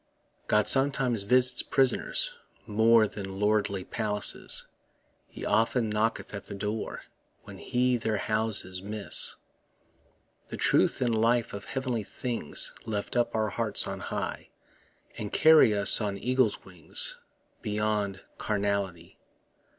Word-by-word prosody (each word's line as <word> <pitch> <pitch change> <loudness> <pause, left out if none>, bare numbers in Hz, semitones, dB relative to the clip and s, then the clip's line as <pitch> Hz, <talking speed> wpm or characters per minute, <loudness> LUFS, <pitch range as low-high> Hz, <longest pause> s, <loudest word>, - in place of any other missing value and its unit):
God 105 0 +2
sometimes 135 -4 +2
visits 125 +4 +2
prisoners 320 - 0 0.3
more 110 +1 +4
Than 95 -2 -8
lordly 105 -2 0
palaces; 105 -2 0 0.6
He - - -9
often 115 0 +1
knocketh 110 +1 -2
at 100 - -7
the - - -8
door 105 +2 -4 0.4
When - - -12
he 125 0 0
their 110 -2 -2
houses 110 -4 +1
miss. 105 +1 +1 1.1
The - - -7
truth - - +2
and 120 -2 +1
life 120 0 +1
of 100 +1 -7
heav'nly 130 -1 -3
things 115 - 0
Lift 105 0 -4
up 120 -2 0
our 110 -1 0
hearts - - -1
on - - -5
high, - - -5 0.7
And 105 -1 -5
carry 155 -9 +5
us 100 +3 +6
on 100 -2 -2
eagles' 125 0 0
wings 90 -5 -3 0.4
Beyond 105 -2 -2 0.2
carnality. 100 -5 -3
110 Hz, 120 wpm, -28 LUFS, 100-120 Hz, 1.1 s, us